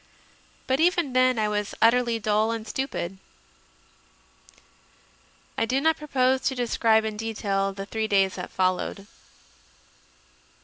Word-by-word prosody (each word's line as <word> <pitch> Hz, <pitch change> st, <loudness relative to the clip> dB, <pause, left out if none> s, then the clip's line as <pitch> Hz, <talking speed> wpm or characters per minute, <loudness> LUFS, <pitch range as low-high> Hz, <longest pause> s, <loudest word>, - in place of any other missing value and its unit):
But 260 Hz, +1 st, 0 dB
even 340 Hz, -5 st, +2 dB
then 255 Hz, -1 st, +3 dB
I 215 Hz, -1 st, +1 dB
was 210 Hz, -1 st, -2 dB
utterly 235 Hz, 0 st, +3 dB
dull 215 Hz, 0 st, +1 dB
and 225 Hz, -1 st, -4 dB
stupid. 205 Hz, -7 st, -4 dB, 2.4 s
I -, -, +2 dB
do 260 Hz, +3 st, +1 dB
not 320 Hz, +2 st, +2 dB
propose 265 Hz, -3 st, +1 dB
to 265 Hz, -, -1 dB
describe 225 Hz, -2 st, +2 dB
in 215 Hz, -1 st, -4 dB
detail 200 Hz, -3 st, -2 dB
the 195 Hz, 0 st, -7 dB
three 220 Hz, +1 st, -3 dB
days 195 Hz, -2 st, +2 dB
that 180 Hz, -, -6 dB
followed. 185 Hz, +2 st, -1 dB
225 Hz, 125 wpm, -25 LUFS, 205-255 Hz, 2.4 s, then